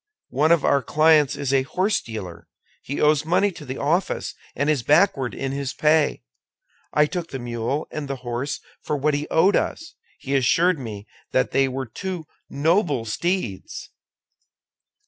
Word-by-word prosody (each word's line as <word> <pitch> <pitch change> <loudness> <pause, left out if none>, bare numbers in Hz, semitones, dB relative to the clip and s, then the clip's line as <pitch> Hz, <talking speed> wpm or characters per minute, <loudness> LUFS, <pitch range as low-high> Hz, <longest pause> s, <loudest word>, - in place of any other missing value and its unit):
One 150 +5 +2
of 170 -3 +4
our 140 - +3
clients 155 +2 +4
is 140 -1 -2
a 135 - +4
horsedealer; 115 - -2 0.4
he 140 - -5
owes 150 0 +3
money 185 +5 +2
to 165 - -11
the 130 -1 -6
office, 170 +6 0 0.2
and 145 +3 0
is 150 -4 +2
backward 145 - +3
in 135 -1 -3
his 140 -1 -3
pay. 150 - +2 0.7
I 150 - +4
took 170 +1 -4
the 135 - -5
mule 120 +3 -3
and 150 -2 -5
the 135 - -3
horse 120 +4 -3 0.2
for 150 - -2
what 150 +2 +1
he 145 +1 -2
owed 185 +5 +4
us; 325 0 -2 0.2
he 135 - -5
assured 165 +6 +3
me 105 -5 -7 0.3
that 130 0 +2
they 135 0 +3
were 130 0 -3
two 175 - -5 0.2
noble 150 - +1
steeds." 115 - -3
145 Hz, 160 wpm, -23 LUFS, 130-160 Hz, 0.7 s, of